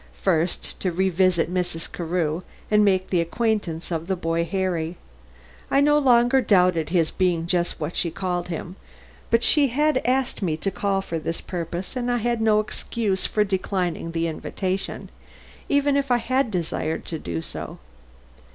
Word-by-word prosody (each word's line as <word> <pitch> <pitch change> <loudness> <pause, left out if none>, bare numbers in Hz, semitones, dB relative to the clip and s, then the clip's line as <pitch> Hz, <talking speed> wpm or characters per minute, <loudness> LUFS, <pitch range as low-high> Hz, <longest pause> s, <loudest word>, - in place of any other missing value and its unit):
First, 175 -2 0
to 185 - 0
revisit 185 -1 +2
Mrs. 175 -3 -2
Carew 170 -1 -1 0.3
and 210 0 +5
make 190 -2 +2
the 175 -3 +3
acquaintance 180 -3 -1
of 165 0 -2
the 190 - 0
boy 165 -1 0
Harry. 175 -3 -2 0.7
I 275 - +3
no 295 +1 +5
longer 250 -1 +4
doubted 180 -7 +3
his 165 -2 +2
being 175 -3 +1
just 175 0 0
what 155 +2 -4
she 170 - +1
called 180 0 -2
him, 175 +2 -6 0.5
but 230 +1 +3
she 295 -2 +5
had 290 +2 +2
asked 260 0 0
me 165 -5 0
to 195 +5 -2
call 195 -1 0
for 165 -3 -3
this 165 +1 -3
purpose 175 +4 -5
and 245 -1 -1
I 245 - +2
had 235 0 0
no 215 -1 +4
excuse 210 -2 -2
for 210 - +2
declining 185 -4 -2
the 165 0 -1
invitation, 185 +4 -3 0.6
even 285 0 +3
if 280 -1 0
I 245 - +4
had 260 +2 0
desired 165 -4 -2
to 160 - -5
do 85 - -4
so. - - -7
185 Hz, 165 wpm, -24 LUFS, 170-225 Hz, 0.7 s, and